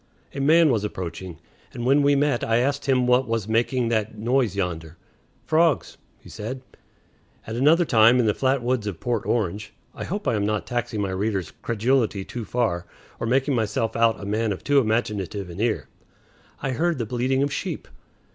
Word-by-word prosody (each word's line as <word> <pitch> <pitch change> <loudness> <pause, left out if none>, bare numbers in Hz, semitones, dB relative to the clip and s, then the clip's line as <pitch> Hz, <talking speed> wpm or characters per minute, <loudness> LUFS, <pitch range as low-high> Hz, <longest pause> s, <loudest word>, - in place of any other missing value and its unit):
A 140 - -5
man 160 +2 +5
was 110 -4 0
approaching, 90 -3 -5 0.4
and 120 - -4
when 140 +3 +4
we 140 0 +4
met 140 -3 +1
I 115 0 +2
asked 140 +3 0
him 130 -2 +3
what 125 +1 +3
was 115 -3 -1
making 120 +2 +1
that 110 -1 -1
noise 120 -1 +1
yonder. 85 -4 -3 0.5
"Frogs," 160 -1 +2 0.2
he - - -18
said. 130 +5 -6 0.8
At 110 - -5
another 155 +8 +4
time, 115 -1 +5
in 120 - +3
the 105 - +3
flat 130 +1 0
woods 120 -3 0
of 95 -5 -5
Port 120 -1 -2
Orange 105 -2 -2 0.2
(I - - -6
hope 205 +4 -4
I - - +2
am 105 -2 0
not 105 0 -1
taxing 120 -3 -2
my 100 -2 -1
reader's 95 -1 -2
credulity 115 -3 0
too 120 -3 -6
far, 100 -9 -1 0.3
or 115 - -2
making 135 +4 +2
myself 110 -1 -1
out 115 -1 +3
a 100 - -7
man 110 +2 0
of 95 - -5
too 145 -1 +4
imaginative 105 -5 -1
an 85 - -9
ear), 115 -1 0 0.8
I 135 - 0
heard 165 +5 0
the 120 - -2
bleating 125 +4 0
of 140 0 -1
sheep. - - -4
115 Hz, 190 wpm, -24 LUFS, 105-130 Hz, 0.8 s, man